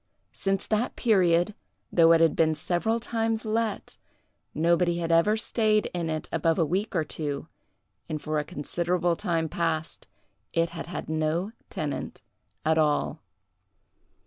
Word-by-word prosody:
Since 195 Hz, 0 st, -1 dB
that 220 Hz, +3 st, 0 dB
period, 185 Hz, -4 st, +3 dB, 0.4 s
though 165 Hz, -1 st, +6 dB
it 165 Hz, 0 st, +6 dB
had 165 Hz, -, +4 dB
been 160 Hz, -1 st, +3 dB
several 180 Hz, +9 st, 0 dB
times 225 Hz, -1 st, -1 dB
let, 220 Hz, 0 st, -2 dB, 0.5 s
nobody 170 Hz, +2 st, +2 dB
had 170 Hz, -1 st, -2 dB
ever 170 Hz, +6 st, +4 dB
stayed 215 Hz, -1 st, +1 dB
in 170 Hz, -2 st, -2 dB
it 155 Hz, -1 st, -3 dB
above 165 Hz, 0 st, +1 dB
a 165 Hz, -, +3 dB
week 190 Hz, +7 st, -1 dB
or 165 Hz, -, +2 dB
two, 150 Hz, -1 st, -4 dB, 0.6 s
and 155 Hz, -1 st, -2 dB
for 155 Hz, 0 st, -1 dB
a -, -, -1 dB
considerable 175 Hz, +4 st, -1 dB
time 165 Hz, -1 st, -1 dB
past 160 Hz, -1 st, -2 dB, 0.5 s
it 165 Hz, 0 st, +2 dB
had 170 Hz, -1 st, -6 dB
had 175 Hz, -, -5 dB
no 160 Hz, +5 st, -1 dB, 0.2 s
tenant 150 Hz, -2 st, -4 dB, 0.4 s
at 160 Hz, 0 st, +3 dB
all. 150 Hz, -1 st, +1 dB
170 Hz, 145 wpm, -27 LUFS, 160-195 Hz, 0.6 s, though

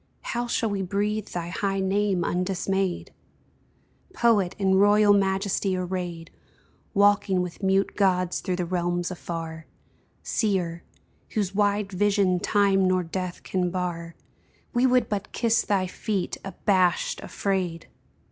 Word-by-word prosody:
How 240 Hz, 0 st, -2 dB
shall 225 Hz, -2 st, 0 dB
we 200 Hz, -1 st, -1 dB
breathe 205 Hz, +3 st, -1 dB
thy 170 Hz, -1 st, -5 dB
high 195 Hz, +2 st, -1 dB
name 190 Hz, -1 st, +1 dB
undismayed? 185 Hz, +1 st, -1 dB, 1.0 s
Poet, 205 Hz, -6 st, +2 dB
in 190 Hz, -2 st, +2 dB
royal 205 Hz, +1 st, +5 dB
majesty 195 Hz, -1 st, +1 dB
arrayed. 175 Hz, -2 st, -4 dB, 0.6 s
Walking 200 Hz, -2 st, +3 dB
with 180 Hz, +1 st, -7 dB
mute 195 Hz, 0 st, +1 dB
gods 185 Hz, -3 st, +1 dB
through 185 Hz, -3 st, -2 dB
the 180 Hz, -1 st, -2 dB
realms 175 Hz, 0 st, -1 dB
afar 165 Hz, -2 st, -6 dB, 0.6 s
Seer, 180 Hz, -6 st, -1 dB, 0.5 s
whose 200 Hz, -3 st, 0 dB
wide 205 Hz, 0 st, +1 dB
vision 195 Hz, -1 st, +2 dB
time 195 Hz, -1 st, +3 dB
nor 185 Hz, 0 st, +2 dB
death 180 Hz, +1 st, -5 dB
can 180 Hz, -1 st, -1 dB
bar, 170 Hz, -2 st, -4 dB, 0.6 s
We 245 Hz, +1 st, +3 dB
would 250 Hz, -2 st, +3 dB
but 205 Hz, -1 st, -4 dB
kiss 230 Hz, 0 st, +2 dB
thy 195 Hz, -2 st, 0 dB
feet, 190 Hz, +1 st, -3 dB
abashed, 190 Hz, -2 st, +1 dB
afraid 185 Hz, -4 st, -2 dB
190 Hz, 125 wpm, -25 LUFS, 180-205 Hz, 1.0 s, royal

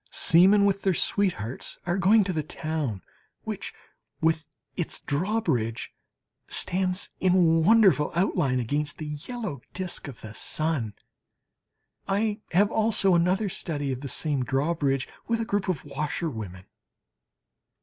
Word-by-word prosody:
Seamen 195 Hz, +5 st, +5 dB
with 200 Hz, 0 st, +1 dB
their 190 Hz, -3 st, +1 dB
sweethearts 165 Hz, -, -1 dB
are 175 Hz, +2 st, 0 dB
going 205 Hz, +4 st, +5 dB
to 185 Hz, -1 st, -2 dB
the 155 Hz, -, 0 dB
town, 150 Hz, -, -4 dB, 0.4 s
which, -, -, -5 dB, 0.5 s
with 160 Hz, -1 st, +1 dB, 0.3 s
its 175 Hz, -, -1 dB
drawbridge, 145 Hz, -, -1 dB, 0.5 s
stands 185 Hz, +1 st, +1 dB
in 175 Hz, -3 st, +4 dB
wonderful 200 Hz, -6 st, +5 dB
outline 170 Hz, -8 st, +1 dB
against 145 Hz, +5 st, -2 dB
the 155 Hz, -, -6 dB, 0.2 s
yellow 220 Hz, -, -5 dB
disc 180 Hz, -4 st, -4 dB
of 135 Hz, -5 st, -10 dB
the 110 Hz, -1 st, -9 dB
sun. 135 Hz, -5 st, -2 dB, 1.1 s
I 205 Hz, +2 st, 0 dB
have 200 Hz, +5 st, +3 dB
also 215 Hz, -3 st, +3 dB
another 180 Hz, +5 st, +2 dB
study 145 Hz, -6 st, -3 dB
of 130 Hz, 0 st, -4 dB
the 140 Hz, -, -5 dB
same 145 Hz, -3 st, +1 dB
drawbridge, 135 Hz, 0 st, 0 dB, 0.2 s
with 230 Hz, 0 st, +1 dB
a 230 Hz, -, -1 dB
group 205 Hz, -3 st, -1 dB
of 165 Hz, -7 st, -2 dB
washerwomen. 135 Hz, -, -4 dB
165 Hz, 130 wpm, -26 LUFS, 140-195 Hz, 1.1 s, Seamen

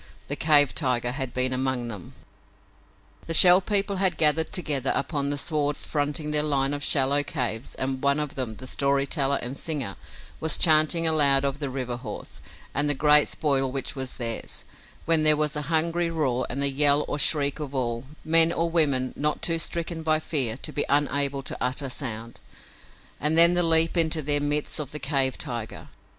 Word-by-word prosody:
The -, -, -2 dB
cave 145 Hz, -3 st, +4 dB
tiger 125 Hz, -4 st, -1 dB
had 130 Hz, -1 st, -4 dB
been 130 Hz, +1 st, -2 dB
among 130 Hz, -2 st, -2 dB
them! 105 Hz, -6 st, -9 dB, 1.1 s
The 165 Hz, -, +1 dB
Shell 180 Hz, +3 st, +8 dB
People 200 Hz, 0 st, -1 dB
had 185 Hz, -3 st, 0 dB
gathered 160 Hz, +1 st, +2 dB
together 145 Hz, -7 st, -2 dB
upon 140 Hz, -1 st, -2 dB
the 145 Hz, -, -2 dB
sward 145 Hz, -1 st, -1 dB
fronting 150 Hz, +1 st, -4 dB
their 150 Hz, 0 st, +1 dB
line 140 Hz, -2 st, -1 dB
of 145 Hz, 0 st, -5 dB
shallow 140 Hz, 0 st, +2 dB
caves 125 Hz, -5 st, -4 dB
and 130 Hz, 0 st, -4 dB
one 140 Hz, +1 st, +1 dB
of 150 Hz, -2 st, -2 dB
them, 125 Hz, -5 st, -5 dB
the 130 Hz, -, -10 dB
story 140 Hz, +1 st, 0 dB
teller 140 Hz, -1 st, 0 dB
and 125 Hz, +3 st, -6 dB
singer, 140 Hz, -9 st, -4 dB, 0.4 s
was 160 Hz, 0 st, -1 dB
chanting 160 Hz, +1 st, +4 dB
aloud 140 Hz, -4 st, +3 dB
of 140 Hz, 0 st, -3 dB
the 140 Hz, -3 st, -4 dB
river 125 Hz, -2 st, -5 dB
horse 115 Hz, -4 st, -9 dB, 0.3 s
and 145 Hz, +2 st, 0 dB
the 145 Hz, -, +3 dB
great 150 Hz, +1 st, +5 dB
spoil 135 Hz, -3 st, -1 dB
which 135 Hz, +2 st, -4 dB
was 130 Hz, -1 st, -6 dB
theirs, 115 Hz, -2 st, -4 dB, 0.4 s
when 165 Hz, -1 st, +3 dB
there 155 Hz, -1 st, +4 dB
was 150 Hz, -1 st, -1 dB
a 150 Hz, -, -3 dB
hungry 170 Hz, +1 st, +1 dB
roar 130 Hz, -7 st, -2 dB
and 140 Hz, +3 st, -3 dB
the 140 Hz, -, +2 dB
yell 145 Hz, +1 st, +3 dB
or 145 Hz, -, -4 dB
shriek 145 Hz, 0 st, +2 dB
of 140 Hz, -2 st, -7 dB
all, 120 Hz, -1 st, -3 dB, 0.2 s
men 165 Hz, +1 st, +5 dB
or 170 Hz, 0 st, -2 dB
women 140 Hz, -6 st, +1 dB
not 150 Hz, +1 st, -2 dB
too 165 Hz, -1 st, 0 dB
stricken 170 Hz, 0 st, -3 dB
by 155 Hz, -1 st, +1 dB
fear 130 Hz, -8 st, -2 dB
to 150 Hz, -, -6 dB
be 145 Hz, -, 0 dB
unable 140 Hz, -1 st, 0 dB
to -, -, -6 dB
utter 130 Hz, +2 st, -3 dB
sound, 115 Hz, -3 st, -5 dB, 0.8 s
and 150 Hz, +2 st, +1 dB
then 170 Hz, +1 st, +9 dB
the 175 Hz, -, +2 dB
leap 165 Hz, 0 st, +3 dB
into 160 Hz, -2 st, 0 dB
their 145 Hz, +1 st, +1 dB
midst 145 Hz, +1 st, 0 dB
of 145 Hz, -2 st, -7 dB
the 150 Hz, -, -5 dB
cave 135 Hz, -2 st, -1 dB
tiger! 120 Hz, -6 st, -6 dB
145 Hz, 190 wpm, -24 LUFS, 130-155 Hz, 1.1 s, then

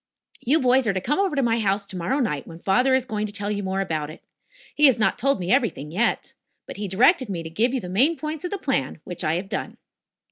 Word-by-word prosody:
"You 290 Hz, +7 st, +2 dB
boys 255 Hz, -1 st, +3 dB
are 200 Hz, -, +2 dB
to 190 Hz, -, -1 dB
come 295 Hz, -, -1 dB
over 390 Hz, -6 st, +1 dB
to 275 Hz, -, +1 dB
my 230 Hz, -1 st, +1 dB
house 200 Hz, -1 st, 0 dB
tomorrow 185 Hz, +6 st, -2 dB
night, 150 Hz, -, -2 dB
when 165 Hz, -, -10 dB
father 250 Hz, +9 st, +2 dB
is 260 Hz, -1 st, 0 dB
going 215 Hz, -2 st, -3 dB
to -, -, -6 dB
tell 205 Hz, 0 st, -3 dB
you 205 Hz, -1 st, -2 dB
more 190 Hz, 0 st, -2 dB
about 155 Hz, -5 st, -3 dB
it. 155 Hz, -, -12 dB, 0.5 s
He 300 Hz, 0 st, +6 dB
has 260 Hz, -, +4 dB
not 220 Hz, -, +1 dB
told 275 Hz, -2 st, +2 dB
me 180 Hz, +1 st, -2 dB
everything 230 Hz, -, 0 dB
yet. 220 Hz, +8 st, -1 dB, 0.3 s
But -, -, -9 dB
he 205 Hz, 0 st, -3 dB
directed 240 Hz, -, +3 dB
me 170 Hz, -4 st, -4 dB
to 160 Hz, -, -8 dB
give 230 Hz, +8 st, +1 dB
you 265 Hz, -, -1 dB
the 180 Hz, -, -7 dB
main 260 Hz, -, +2 dB
points 305 Hz, 0 st, -5 dB
of 360 Hz, -, -3 dB
the 405 Hz, -, -3 dB
plan, 250 Hz, -, -2 dB
which 175 Hz, -, -6 dB
I 155 Hz, -, +1 dB
have 185 Hz, +3 st, -3 dB
done." -, -, -5 dB
210 Hz, 260 wpm, -23 LUFS, 185-265 Hz, 0.5 s, He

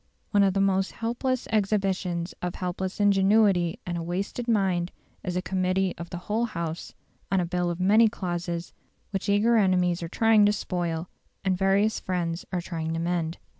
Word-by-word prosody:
One 205 Hz, -, +4 dB
of 195 Hz, -1 st, +3 dB
the 195 Hz, -, +2 dB
most 195 Hz, -1 st, +1 dB
helpless 245 Hz, +2 st, -2 dB
exhibitions 195 Hz, -4 st, 0 dB
of 180 Hz, 0 st, -3 dB
helpless 185 Hz, +1 st, -4 dB
ingenuity 195 Hz, -3 st, +4 dB
and 175 Hz, -1 st, -3 dB
wasted 195 Hz, +7 st, -3 dB
mind 190 Hz, -6 st, +1 dB, 0.3 s
is 180 Hz, -1 st, -3 dB
a 180 Hz, -, -1 dB
committee 185 Hz, 0 st, 0 dB
of 170 Hz, 0 st, -6 dB
the 175 Hz, -, -5 dB
whole 225 Hz, +3 st, 0 dB
House 170 Hz, -6 st, -5 dB, 0.4 s
on 195 Hz, -, +3 dB
a 180 Hz, -, +1 dB
bill 175 Hz, 0 st, -1 dB
of 175 Hz, 0 st, -4 dB
many 215 Hz, +5 st, +5 dB
clauses 175 Hz, -4 st, -4 dB, 0.4 s
which 195 Hz, 0 st, -2 dB
eager 220 Hz, +4 st, +4 dB
enemies 180 Hz, -4 st, +2 dB
are 165 Hz, -, -4 dB
trying 225 Hz, +2 st, +4 dB
to 205 Hz, -, +3 dB
spoil, 175 Hz, -4 st, -2 dB, 0.4 s
and 190 Hz, -1 st, +2 dB
various 195 Hz, +3 st, +2 dB
friends 175 Hz, -2 st, -2 dB
are 180 Hz, -2 st, -1 dB
trying 165 Hz, -2 st, -3 dB
to -, -, -2 dB
mend. 170 Hz, -1 st, -1 dB
185 Hz, 170 wpm, -26 LUFS, 175-205 Hz, 0.4 s, many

